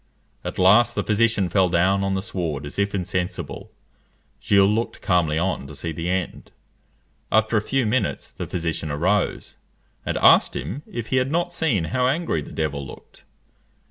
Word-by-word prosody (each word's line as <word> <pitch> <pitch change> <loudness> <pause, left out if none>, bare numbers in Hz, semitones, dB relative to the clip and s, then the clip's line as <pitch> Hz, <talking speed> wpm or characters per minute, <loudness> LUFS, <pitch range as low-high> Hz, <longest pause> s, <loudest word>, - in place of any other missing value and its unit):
At - - -5
last 110 +6 +5
the - - 0
physician 110 -2 +2
fell 95 +1 +2
down 95 +3 +2
on 95 0 0
the 95 - -2
sward 80 -8 -3
as 75 - -7
if 100 0 0
insensible. 90 -1 -4 0.7
Gilles 100 -1 +4
looked 110 +3 -1
calmly 85 -5 +2
on 85 -5 -1
to 75 - -10
see 85 +4 -5
the 85 +2 -4
end. 95 0 -3 0.8
After 110 +1 +2
a 105 - +3
few 135 +4 0
minutes 110 0 -1
the - - -6
physician 80 -2 -3
arose, 90 +8 -1 0.5
and - - -2
asked - - +5
him 135 +8 -4
if 115 -2 -6
he 130 - +1
had 130 +1 +1
not 175 +3 0
seen 140 - 0
how 125 +11 0
angry 140 - 0
the - - -10
devil 75 -3 -2
looked? 65 - -13
95 Hz, 175 wpm, -23 LUFS, 85-115 Hz, 0.8 s, last